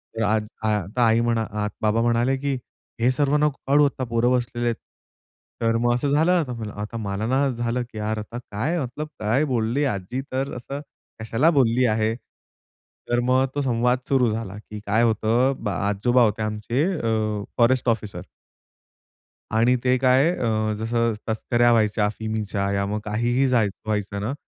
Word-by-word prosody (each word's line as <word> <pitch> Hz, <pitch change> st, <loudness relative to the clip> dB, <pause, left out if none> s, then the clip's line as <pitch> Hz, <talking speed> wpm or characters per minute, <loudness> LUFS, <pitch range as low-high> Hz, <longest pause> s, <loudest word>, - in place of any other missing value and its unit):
तर 115 Hz, -, -1 dB
आज 105 Hz, +1 st, +1 dB, 0.2 s
आ -, -, +2 dB
आता 105 Hz, +6 st, -1 dB
आई 115 Hz, 0 st, +4 dB
म्हणा 115 Hz, -1 st, +1 dB
आ 105 Hz, 0 st, -2 dB
बाबा 110 Hz, +1 st, +2 dB
म्हणाले 120 Hz, +3 st, +2 dB
की, 140 Hz, 0 st, -2 dB, 0.5 s
"हे 125 Hz, -, +4 dB
सर्व 140 Hz, +2 st, +1 dB
नको 150 Hz, -2 st, +1 dB
काढू, 145 Hz, +1 st, +5 dB
आता 135 Hz, -2 st, -2 dB
पोरं 120 Hz, +2 st, +2 dB
बसलेले 120 Hz, -1 st, -1 dB
आहेत." 115 Hz, -, +1 dB, 0.9 s
तर 115 Hz, 0 st, +2 dB
मग 120 Hz, +1 st, +2 dB
असं 125 Hz, +4 st, 0 dB
झालं 160 Hz, +5 st, +3 dB
आता. 155 Hz, -9 st, +1 dB, 0.3 s
आता 105 Hz, +2 st, -5 dB
मला 100 Hz, -1 st, -3 dB
ना 130 Hz, +3 st, +2 dB
असं 120 Hz, -3 st, -2 dB
झालं 120 Hz, +1 st, 0 dB
की 110 Hz, -, -10 dB
"यार, 110 Hz, +1 st, -2 dB
आता 110 Hz, +3 st, -7 dB
काय 140 Hz, +12 st, -1 dB
मतलब 135 Hz, +4 st, -5 dB
काय 110 Hz, +7 st, +1 dB
बोलली 115 Hz, +5 st, 0 dB
आजी 100 Hz, +8 st, -4 dB
तर 135 Hz, +2 st, -2 dB
असं 135 Hz, +3 st, -6 dB, 0.4 s
कशाला 115 Hz, +8 st, +2 dB
बोलली 125 Hz, -1 st, +3 dB
आहे?" 110 Hz, -1 st, +1 dB, 1.0 s
तर 120 Hz, -, +2 dB
मग 130 Hz, +2 st, +3 dB
तो 145 Hz, -, 0 dB
संवाद 125 Hz, -1 st, +1 dB
सुरू 130 Hz, -3 st, +3 dB
झाला 105 Hz, -3 st, -4 dB
की 105 Hz, 0 st, -9 dB
काय 110 Hz, +3 st, +2 dB
होतं 115 Hz, +3 st, +2 dB
अ, -, -, -1 dB
ब 110 Hz, -, -5 dB
आजोबा 105 Hz, +5 st, +2 dB
होते 110 Hz, 0 st, +1 dB
आमचे 110 Hz, +5 st, -1 dB
अ, 110 Hz, -, -1 dB
फॉरेस्ट 125 Hz, +1 st, +3 dB
ऑफिसर. 110 Hz, -2 st, -2 dB, 1.3 s
आणि 115 Hz, +3 st, +3 dB
ते 130 Hz, 0 st, +3 dB
काय 130 Hz, +4 st, +4 dB
अ, 110 Hz, -2 st, 0 dB
जसं 115 Hz, +1 st, 0 dB, 0.2 s
तस्कऱ्या 120 Hz, +2 st, +2 dB
व्हायच्या 110 Hz, -2 st, +2 dB
अफिमीच्या 105 Hz, -2 st, -2 dB
या 100 Hz, 0 st, 0 dB
मग 105 Hz, +2 st, -2 dB
काहीही 120 Hz, +5 st, +1 dB
जाय 120 Hz, -5 st, +3 dB, 0.2 s
व्हायचं 105 Hz, -2 st, -2 dB
ना, 110 Hz, +6 st, -2 dB
115 Hz, 175 wpm, -23 LUFS, 110-125 Hz, 1.3 s, काढू